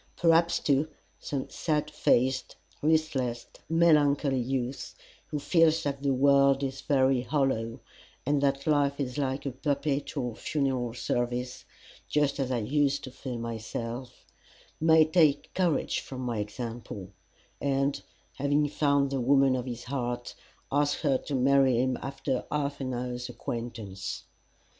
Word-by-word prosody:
Perhaps, 170 0 +4
too, 140 +1 +2 0.3
some 140 -2 -4
sad 150 -2 -1
faced, 130 -2 +1 0.3
listless, 145 -6 +1 0.2
melancholy 150 -4 +3
youth, 130 +1 -3 0.3
who 150 - -3
feels 165 +2 +3
that 140 -1 -2
the 140 -1 +1
world 140 +1 +4
is 135 0 -3
very 130 -2 +2
hollow, 125 -3 -1 0.5
and 145 +1 +2
that 140 -1 +1
life 145 -2 +2
is 135 0 -2
like 135 0 -2
a 140 - -1
perpetual 140 -2 -2
funeral 130 -4 -1
service, 120 +1 -2 0.4
just 145 -1 +1
as 135 -2 0
I 120 -2 0
used 140 +4 +1
to 130 - -7
feel 130 -1 -6
myself, 115 +2 -5 0.5
may 160 0 +6
take 155 -3 +2
courage 180 -4 +1
from 130 -1 -7
my 120 -3 -2
example, 105 -2 -6 0.5
and 140 0 0 0.4
having 145 +2 +2
found 140 -2 +2
the 135 -2 -1
woman 135 +1 +4
of 125 0 -3
his 120 -1 -5
heart, 120 -2 -3 0.4
ask 145 +1 +1
her 135 -4 +2
to 145 - -4
marry 135 -1 +4
him 130 0 +1
after 135 -2 -2
half 145 -1 -2
an 130 -1 -2
hour's 125 0 -4
acquaintance. 115 -5 -5
135 Hz, 135 wpm, -28 LUFS, 125-145 Hz, 0.5 s, may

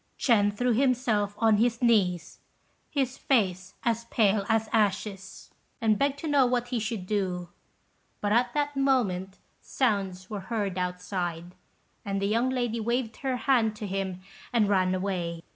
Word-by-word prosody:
Ch'ên 205 -5 +3
threw 245 +4 0
himself 235 -5 +1
on 220 -2 +4
his 230 +1 +1
knees, 195 -8 +1 0.5
his 270 -3 -1
face 190 -8 0
as 230 0 0
pale 210 -3 +2
as 220 0 +2
ashes, 200 -2 -1 0.3
and 215 -2 +2
begged 280 0 +1
to 315 - -5
know 285 -2 +4
what 245 -1 -1
he 245 -2 -1
should 215 -3 -3
do; 185 -4 -2 0.7
but 205 - -1
at 240 +2 +3
that 290 -1 0
moment 210 -9 +1 0.2
sounds 195 -7 -1
were 210 0 -5
heard 205 -5 -1
outside, 180 -1 -3 0.5
and 195 -1 -2
the 195 - -1
young 230 +5 +1
lady 240 -3 -1
waved 235 +1 -1
her 265 -2 -2
hand 230 -4 +2
to 210 - -6
him, 190 -2 -3 0.3
and 230 -4 +3
ran 185 -2 +2
away. 175 -3 -3
215 Hz, 155 wpm, -27 LUFS, 190-245 Hz, 0.7 s, on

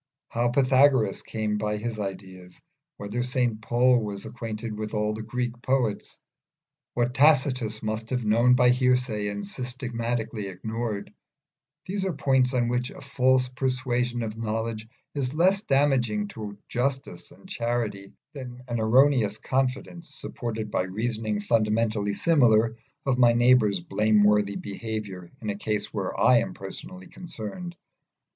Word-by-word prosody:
How 120 +1 +1
Pythagoras 130 -4 +3
came 105 -1 -2
by 105 0 -1
his 110 0 -4
ideas, 95 -2 -7 0.4
whether 105 +4 -3
St 125 -3 0
Paul 125 +2 +3
was 105 -2 -5
acquainted 110 -1 -5
with 105 0 -5
all 105 0 0
the 110 - -5
Greek 120 +2 -4
poets, 125 -6 -1 0.8
what 120 +1 +1
Tacitus 130 -6 +3
must 110 +1 -3
have 125 -3 -1
known 120 +4 +5
by 125 0 +5
hearsay 125 -4 +1
and 100 0 -4
systematically 120 -2 -3
ignored, 110 +2 -4 0.9
are 190 -2 -1
points 130 -2 +2
on 120 -1 +2
which 125 +1 -1
a - - -11
false 130 0 +2
persuasion 125 -2 -1
of 110 0 -5
knowledge 110 0 -3 0.3
is 140 -1 -2
less 190 +4 +3
damaging 130 - +1
to 105 -2 -7
justice 135 +2 -2
and - - -17
charity 115 - -2 0.2
than 125 -3 -8
an 120 -1 -2
erroneous 115 -2 +4
confidence, 135 +5 -2
supported 110 -3 -5
by - - +1
reasoning 110 +2 -2
fundamentally 105 -1 +1
similar, 115 -8 +4 0.3
of 130 -2 +1
my 120 -1 +6
neighbour's 120 -5 +4
blameworthy 105 +1 +3
behaviour 100 -4 -5
in 105 - -1
a - - -4
case 105 0 -3
where - - -3
I - - +6
am - - -4
personally 90 0 -8
concerned. 175 - -7
115 Hz, 135 wpm, -26 LUFS, 105-125 Hz, 0.9 s, my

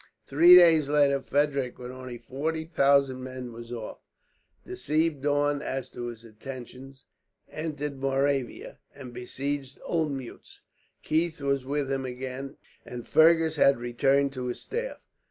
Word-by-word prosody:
Three 170 +6 +7
days 165 -5 +6
later 140 -2 +3
Frederick, 140 -3 0
with 125 -1 -9
forty 160 +6 -3
thousand 140 -4 +2
men, 130 -1 -7
was 115 +1 -10
off; 115 -3 -7 0.7
deceived 155 -1 -1
Daun 145 0 +1
as 135 -3 -4
to 120 0 -6
his 115 -1 -9
intentions, 130 +3 -10 0.5
entered 150 -3 -4
Moravia, 135 -1 -1 0.2
and 130 -3 -10
besieged 135 +2 -4
Olmuetz. 145 -7 -4 0.4
Keith 160 +1 0
was 140 -2 -1
with 140 0 -2
him 135 -1 -1
again, 130 +2 -6 0.3
and 120 -1 -8
Fergus 160 0 +4
had 140 -2 +5
returned 135 +4 +1
to 125 -2 -4
his 125 - -4
staff. 480 +3 -4
140 Hz, 130 wpm, -27 LUFS, 130-150 Hz, 0.7 s, Three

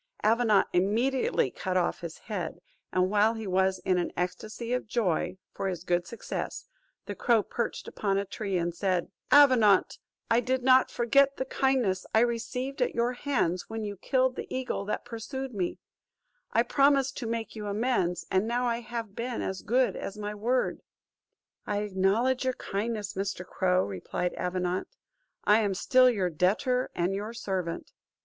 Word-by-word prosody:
Avenant 220 -2 +4
immediately 220 - +1
cut 185 -1 -2
off 175 - 0
his 170 -2 -6
head; 200 -8 -5 0.3
and 185 +1 +2
while 210 +2 +3
he 220 -1 -5
was 190 0 +2
in 185 -1 +3
an 175 - -2
ecstasy 215 +6 -3
of 250 - -2
joy, 185 -5 0 0.2
for 195 - -3
his 180 -3 -3
good 175 -1 0
success, 230 - -5 0.4
the - - -4
crow 230 -4 +2
perched 235 +3 -4
upon 195 -2 -1
a 200 - 0
tree, 195 -1 -3
and 170 0 -1
said, 185 0 -1 0.2
"Avenant, 250 -9 +6 0.3
I 230 0 +4
did 255 +1 -1
not 260 0 +5
forget 275 +4 +3
the 260 - -2
kindnesses 255 -9 +1
I 220 - +6
received 245 +3 -2
at - - +1
your 235 +1 +1
hands, 245 -10 -1
when 225 0 -4
you 205 -1 -4
killed 255 +5 +1
the - - -5
eagle 255 -6 -2
that 210 - -3
pursued 245 +3 -5
me; 185 -4 -2 0.7
I - - +3
promised 275 -1 +3
to 240 - -4
make 230 0 -3
you 210 -1 -5
amends, 205 -4 0
and 190 +3 +2
now 245 +2 0
I 235 -1 0
have 230 -3 -6
been 240 0 -3
as 190 -1 -3
good 250 +3 +2
as 200 - -6
my 210 0 -4
word." 240 +5 0 0.9
"I 205 0 0
acknowledge 210 +7 +1
your 255 -1 0
kindness, 210 +1 -3
Mr. 195 -1 -3
Crow," 185 0 +1
replied 100 - -3
Avenant; 180 0 -2 0.6
"I 210 +2 +5
am 205 -3 0
still 255 +6 +5
your 190 -7 0
debtor, 220 - +1
and 175 +2 0
your 210 +3 -4
servant." 190 -7 -4
215 Hz, 170 wpm, -28 LUFS, 185-245 Hz, 0.9 s, Avenant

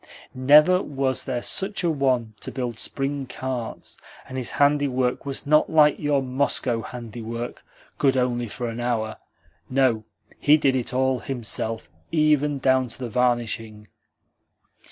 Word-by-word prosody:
Never 150 +8 +6
was 135 -4 -2
there 125 -2 -3
such 195 0 -1
a 170 - +2
one 130 -6 0
to - - -5
build 120 -4 -4
spring 135 0 -3
carts! 125 -4 -5 0.3
And 130 - -8
his 130 -3 -3
handiwork 140 -3 +2
was 140 +2 -4
not 150 +1 +4
like 150 -2 +4
your 145 -2 +1
Moscow 130 -2 0
handiwork 115 0 -7 0.4
good 135 -2 +3
only 120 -1 0
for 120 +3 -5
an 115 +1 -5
hour. 115 -3 -1 0.5
No, 130 -4 +2 0.4
he 150 +1 +5
did 135 -3 +2
it 125 -1 -2
all 130 0 +1
himself, 115 -3 -3 0.2
even 150 -2 +2
down 130 -1 +2
to 115 - -7
the 125 -2 -5
varnishing." 115 -3 -1
130 Hz, 140 wpm, -24 LUFS, 120-140 Hz, 0.5 s, Never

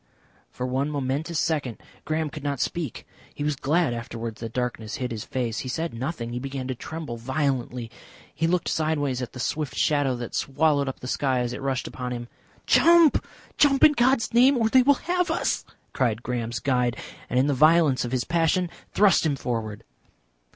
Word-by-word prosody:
For 125 - -5
one 130 +3 -1
momentous 145 +3 -2
second 145 -8 -1 0.3
Graham 155 -1 -1
could 155 - -7
not 140 -2 -2
speak. 160 -3 -3 0.3
He 145 - -4
was 150 0 0
glad 150 +1 +1
afterwards 115 -1 -6
that 115 -2 -5
darkness 120 -3 -3
hid 130 -4 -3
his 110 -2 -4
face. 120 -4 -2
He 130 - -5
said 165 +5 -3
nothing. 120 -1 -4
He 120 - -2
began 135 0 -5
to - - 0
tremble 150 -1 -6
violently. 125 -2 -2 0.4
He 165 - 0
looked 175 0 0
sideways 145 -5 0
at 125 - -6
the 125 - -8
swift 150 +2 -2
shadow 145 -5 +2
that 120 -1 -6
swallowed 145 -1 +1
up 130 - -8
the 125 - -6
sky 130 -1 0
as 120 0 -2
it - - -6
rushed 135 -1 -2
upon 125 -1 -5
him. 120 0 -6 0.4
"Jump! 335 -3 +5 0.4
Jump 275 -2 +4
in 305 - +9
God's 255 -3 +2
name! 255 +3 +6
Or 225 -2 +2
they 260 +2 +6
will 285 +3 +5
have 355 +4 -1
us," 330 - 0 0.3
cried 120 -3 0
Graham's 120 -1 -3
guide, 125 -3 0 0.3
and 125 - -1
in 130 - +4
the 145 - +2
violence 155 0 +4
of 120 - -4
his 130 -1 0
passion 170 +1 +1 0.2
thrust 205 -3 +4
him 155 -4 +1
forward. 115 -5 -4
135 Hz, 190 wpm, -25 LUFS, 125-160 Hz, 0.4 s, in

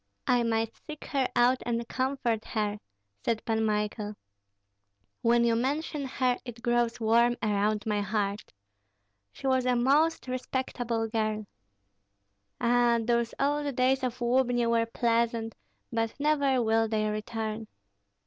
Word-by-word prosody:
"I 245 -1 +3
might 225 -1 0
seek 305 -1 -10
her 270 -3 0
out 245 +1 +4
and 235 -1 -2
comfort 255 -4 -1
her," 210 -1 -2 0.4
said 230 -1 -1
Pan 220 -1 +1
Michael. 210 0 -1 1.1
"When 235 0 +4
you 230 -1 +3
mention 285 +4 -1
her 255 -1 0
it 235 -2 -9
grows 240 -1 +1
warm 235 +2 +3
around 210 0 +1
my 210 -2 0
heart. 205 0 -2 0.8
She - - -11
was 260 -1 +2
a 250 - +3
most 285 +6 +2
respectable 250 -3 -2
girl. 215 -1 -1 1.1
Ah, 240 0 +3
those 235 0 0
old 290 0 0
days 260 +1 +2
of 250 0 -2
Lubni 245 0 +2
were 230 0 +2
pleasant, 230 -1 0 0.4
but 225 +2 -1
never 280 -4 +2
will 225 0 +2
they 215 -1 0
return. 215 +1 -4
235 Hz, 130 wpm, -28 LUFS, 220-255 Hz, 1.1 s, out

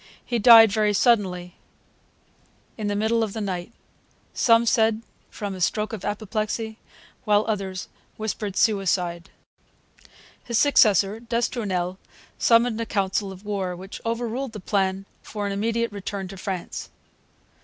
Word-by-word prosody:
He 240 -2 -1
died 225 -1 +9
very 210 0 +2
suddenly, 190 -5 +1 1.2
in 215 -2 -4
the 205 - -1
middle 220 +2 +1
of 215 -3 -2
the 225 - -4
night; 185 -1 -4 0.6
some 230 -1 +4
said 225 -1 +2 0.3
from 205 -3 -5
a 185 - -8
stroke 210 +4 0
of 210 - -6
apoplexy, 215 +1 -3 0.4
while 210 0 +3
others 195 -4 -3 0.3
whispered 210 -2 -4
suicide. 180 -5 +1 1.1
His 235 -2 -1
successor, 215 - +4
d'Estournel, 215 -6 -2 0.4
summoned 230 -1 +3
a - - -2
council 195 0 -1
of 190 +2 -12
war, 195 -3 -2
which 190 +3 -9
overruled 235 +2 -3
the 210 - -6
plan 195 0 -1 0.2
for 210 -1 -5
an 200 - -2
immediate 230 +3 -1
return 200 -1 -5
to 195 - -9
France. 185 -2 -5
210 Hz, 135 wpm, -24 LUFS, 195-225 Hz, 1.2 s, died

